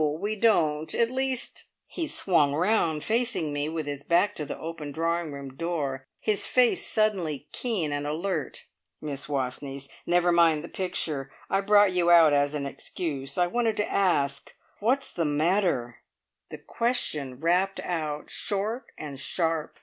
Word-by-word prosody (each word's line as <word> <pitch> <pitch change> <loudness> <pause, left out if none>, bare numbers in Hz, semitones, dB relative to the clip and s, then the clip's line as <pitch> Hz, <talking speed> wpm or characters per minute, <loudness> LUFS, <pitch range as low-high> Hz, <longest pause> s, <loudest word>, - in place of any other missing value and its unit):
We 210 +3 -2
don't. 160 -9 +2
At 235 0 +2
least 260 -1 -1
" - - -57
He 330 -3 -4
swung 160 - +2
round, 165 -3 +1
facing 225 - 0
me, 145 +1 -1
with 160 -1 -3
his 145 -1 -4
back 175 +6 +2
to 150 - -5
the - - -5
open 160 -2 -6
drawing 165 +1 -1
room 140 -2 -8
door, 140 -5 -3
his 215 -2 0
face 250 -2 +3
suddenly 180 -10 0
keen 200 -12 -1
and 145 0 -2
alert. 160 +1 -3 0.3
"Miss 145 -3 -4
Wastneys 135 0 -3 0.2
never 175 0 +3
mind 165 -3 +4
the 170 - -8
picture! 150 -7 -2 0.2
I 195 - +3
brought 205 0 +5
you 175 -1 +2
out 165 -3 +7
as 145 +1 +2
an 140 -1 -2
excuse. 140 +1 -4
I 180 - +4
wanted 225 +3 0
to 210 - -1
ask 140 -8 +1 0.2
Whats 255 +6 0
the 170 - 0
matter?" 150 - +1 0.5
The - - -7
question 150 - -1
rapped 180 +4 +1
out, 155 -4 -3
short 215 +5 -2
and 140 -3 -7
sharp. 165 +1 -1
165 Hz, 155 wpm, -27 LUFS, 145-200 Hz, 0.5 s, out